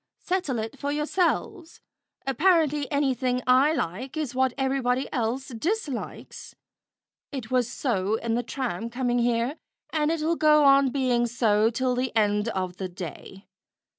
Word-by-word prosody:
"Settle 360 -9 -2
it 220 0 -5
for 285 - -2
yourselves. 340 +3 -1 0.5
Apparently 300 0 +2
anything 260 -3 0
I 260 +4 +5
like 255 - -3
is 295 -5 -2
what 260 0 +2
everybody 265 -1 0
else 250 +3 -2
dislikes. 290 - -4 0.8
It 255 -5 -6
was 250 -2 +2
so 215 -6 -1
in 230 0 -2
the 240 - +1
tram 235 -4 -4
coming 245 0 0
here, 240 +4 0 0.3
and 305 -1 +1
it'll 325 0 0
go 300 -1 +5
on 275 -1 +6
being 250 -3 +1
so 225 -2 +2
till 250 +2 0
the 250 0 -1
end 210 0 +2
of 185 -4 -3
the 190 -2 -4
day. 180 +2 -9
255 Hz, 140 wpm, -26 LUFS, 230-285 Hz, 0.8 s, on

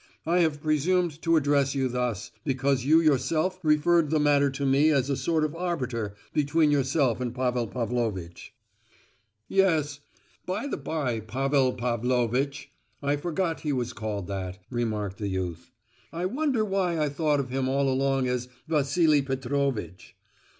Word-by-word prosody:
I 170 +3 +2
have 155 -4 +1
presumed 160 +1 +1
to 165 0 +2
address 145 -2 +2
you 135 -1 +1
thus, 125 -4 -2
because 135 -2 0
you 155 +3 +6
yourself 160 +4 +1
referred 155 0 +3
the 155 0 +2
matter 145 -1 +3
to 140 +1 -3
me 140 +3 +4
as 140 -2 +2
a - - +1
sort 160 +2 0
of 155 -1 -1
arbiter 125 - -3 0.2
between 150 +1 +2
yourself 135 -3 +1
and 125 -1 -3
Pavel 125 -2 0
Pavlovitch." 110 -8 -3 1.0
"Yes, 160 -7 +2 0.4
by 195 +7 -3
the 285 - -2
bye, 140 -5 -2
'Pavel 130 +4 +1
Pavlovitch,' 125 +3 -1 0.3
I 140 +1 +2
forgot 165 +2 -2
he 150 - -2
was 125 -3 -2
called 105 -2 -4
that," 95 -1 -5
remarked 110 -4 -2
the 105 - -2
youth. 90 -3 -4 0.4
"I 170 +2 -3
wonder 255 +1 0
why 190 -4 0
I 150 - +2
thought 145 0 +1
of 130 -2 -3
him 130 0 -1
all 140 +1 +1
along 135 0 +1
as 125 0 -2 0.2
'Vassili 155 0 +3
Petrovitch. 130 - -3
140 Hz, 150 wpm, -27 LUFS, 125-155 Hz, 1.0 s, you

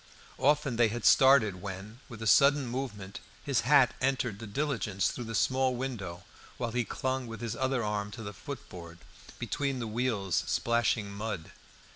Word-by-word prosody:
Often 145 -3 +2
they 120 -1 +5
had 115 +1 -4
started 120 -9 +5
when, 100 +4 -7
with 115 -2 -8
a - - -4
sudden 140 +5 +5
movement, 120 -6 -5 0.2
his - - +1
hat - - +5
entered 125 -6 0
the 115 - -7
diligence 105 -5 -1
through 120 - -6
the 115 0 -5
small 130 +3 +2
window, 100 -9 -5 0.3
while 120 -2 -2
he 120 +1 0
clung 130 +1 -2
with 115 -2 -7
his 115 -2 -4
other 130 -2 0
arm 105 -1 -2
to 115 - -7
the 100 -1 -6
footboard, 90 -7 -9 0.4
between 140 -2 -2
the 120 - -3
wheels 110 -5 0
splashing 115 -3 +1
mud. 100 -5 -5
115 Hz, 165 wpm, -30 LUFS, 100-130 Hz, 0.4 s, they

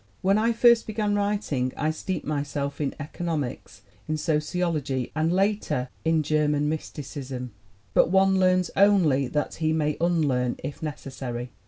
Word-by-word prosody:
"When 195 +3 +4
I 230 +2 +2
first 235 0 +5
began 215 -1 -1
writing 200 -11 0
I 155 +2 +1
steeped 175 +2 -4
myself 145 -1 -3
in 140 - -1
economics, 150 -2 -4 0.3
in 155 - 0
sociology 150 -4 -1
and 160 +1 +1
later 190 -9 0
in 160 -1 +2
German 150 -1 +1
mysti 150 -1 -4
cism. 130 -2 -6 0.4
But - - +4
one 190 +1 +4
learns 185 -1 +3
only 175 -10 +4
that 150 +3 -2
he 155 0 +2
may 150 -2 0
unlearn, 145 -8 +1
if 140 +2 -6
necessary. 130 -5 -5
155 Hz, 145 wpm, -26 LUFS, 140-185 Hz, 0.4 s, first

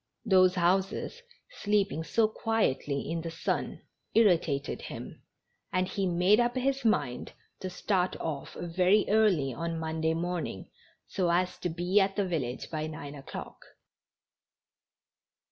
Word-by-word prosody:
Those 185 -3 +5
houses, 190 - 0 0.4
sleeping 200 -6 +1
so 220 +6 +2
quietly 215 - -1
in 165 +2 -2
the 165 - -4
sun, 165 - -3 0.3
irritated 165 -10 +2
him, - - -8 0.5
and 185 0 +1
he 195 0 -1
made 180 +5 +4
up 240 +1 +2
his 270 +1 0
mind 170 - 0 0.3
to 185 - -4
start 185 0 0
off 150 -4 -4
very 180 +4 +3
early 195 - +3
on 165 +5 -3
Monday 160 0 -1
morning, 170 - -3 0.3
so 180 -3 -1
as 180 +2 +1
to 180 - -2
be 175 +4 +2
at 195 0 +1
the 205 - +1
village 140 -9 -3
by 155 -1 -2
nine 150 -2 -7
o'clock. 140 -2 -8
180 Hz, 130 wpm, -29 LUFS, 160-200 Hz, 0.5 s, Those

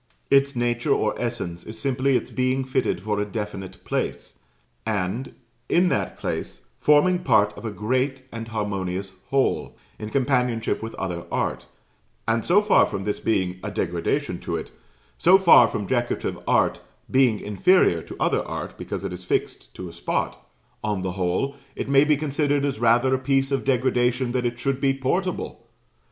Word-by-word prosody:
Its 140 0 +4
nature 120 +2 -1
or - - +2
essence 115 -8 -3
is 110 +1 -9
simply 130 +2 +1
its - - -6
being 130 +1 0
fitted 130 -6 0
for 105 +2 -2
a - - +1
definite 105 -2 -6
place; - - -3 0.4
and, 105 +3 -2 0.3
in 180 +1 +4
that - - -1
place, - - -5
forming 165 +5 +4
part 105 - +3
of - - -9
a - - -1
great 130 +5 -1
and 115 -1 -6
harmonious 100 -3 -3 0.2
whole, 135 -1 0 0.2
in 105 - -5
companionship 125 -2 0
with 115 0 -6
other 90 -3 -4
art; - - -2 0.6
and 115 0 +1
so 200 +5 +4
far 210 - +5
from 100 -2 -4
this 105 +1 -2
being 95 -4 0
a 105 - -3
degradation 90 -4 -1
to - - -3
it - - -7 0.5
so 185 +3 +7
far 170 -11 +7
from 105 -2 -3
Decorative 120 +1 -1
art - - +2 0.3
being 130 -5 +4
inferior 105 - +3
to - - -10
other - - +2
art - - -6
because - - -5
it - - -3
is 90 0 -8
fixed 90 - -2
to 90 - -6
a 85 - -10
spot 85 - -2 0.4
on 105 -3 -1
the 95 - -1
whole 95 +10 -1 0.2
it - - -4
may 140 +1 +5
be 150 -1 +3
considered 145 -1 0
as 135 -5 -2
rather 120 +3 +4
a 130 - +2
piece 135 +1 +1
of 135 - 0
degradation 125 -1 +1
that 125 -1 0
it 120 0 -4
should 135 +2 -1
be 135 -1 +2
portable. 180 +8 -2
120 Hz, 170 wpm, -24 LUFS, 105-135 Hz, 0.6 s, so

